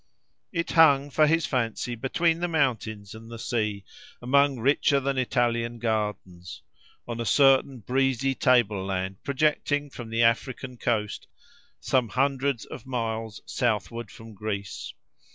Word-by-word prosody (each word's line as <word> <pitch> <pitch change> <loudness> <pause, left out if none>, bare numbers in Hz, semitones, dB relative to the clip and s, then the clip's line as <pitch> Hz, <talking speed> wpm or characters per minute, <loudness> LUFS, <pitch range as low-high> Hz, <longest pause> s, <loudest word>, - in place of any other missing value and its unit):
It 170 -2 -2
hung, 145 -3 +5
for 155 +2 +4
his 165 0 +2
fancy, 120 -1 -2
between 160 +8 0
the 175 - 0
mountains 110 - -1
and 115 +1 -11
the 115 - -8
sea, 105 -4 -2 0.3
among 140 +2 +3
richer 140 +3 +3
than 135 0 -1
Italian 120 -2 0
gardens, 105 -6 -3 0.4
on 120 -1 -4
a - - -1
certain 135 0 +3
breezy 135 +3 +1
table 120 -7 +2
land 95 0 -3
projecting 145 0 0
from 120 -3 -8
the 115 +1 +1
African 125 +2 0
coast, 105 -3 -2 0.5
some 125 -4 +1
hundreds 135 0 0
of - - -10
miles 115 -4 -3
southward 115 -1 -2
from 115 +2 -12
Greece. 100 -1 -5
120 Hz, 135 wpm, -26 LUFS, 110-135 Hz, 0.5 s, hung